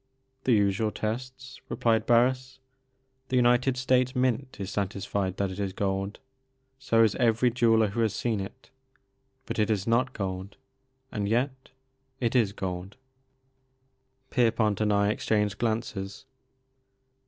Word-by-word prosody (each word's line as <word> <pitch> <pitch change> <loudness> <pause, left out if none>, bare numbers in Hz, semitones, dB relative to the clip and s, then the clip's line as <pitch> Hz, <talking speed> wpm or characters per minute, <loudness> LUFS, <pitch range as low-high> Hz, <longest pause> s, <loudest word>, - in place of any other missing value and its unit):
"The 125 - +4
usual 100 0 +2
tests," 130 +5 -5
replied 110 -2 +1
Harris. 130 +2 +2 0.7
"The 130 - 0
United 125 +1 +3
States 130 0 +2
Mint 130 0 0
is 100 0 -4
satisfied 100 -1 -2
that 100 -1 -1
it 95 - -7
is 100 -2 -2
gold, 95 +1 -2 0.6
so 115 -4 +3
is 110 - +3
every 120 0 +3
jeweller 115 -3 +3
who 110 +4 -4
has 110 -3 +1
seen 115 -3 -1
it. 95 0 -9 0.8
Hut - - -3
it 105 - +2
is 105 -3 0
not 125 +3 +1
gold, 95 +1 -5 0.3
— 130 0 -46
and 100 -1 -2
yet 130 +3 -1 0.2
— 135 0 -46
^it 120 0 0
is 115 -6 +3
gold." 95 +1 -5 1.3
Pierpont 110 -5 +2
and 105 -1 +2
I 100 0 +3
exchanged 105 -1 0
glances. 110 -3 -3
110 Hz, 140 wpm, -27 LUFS, 100-125 Hz, 1.3 s, The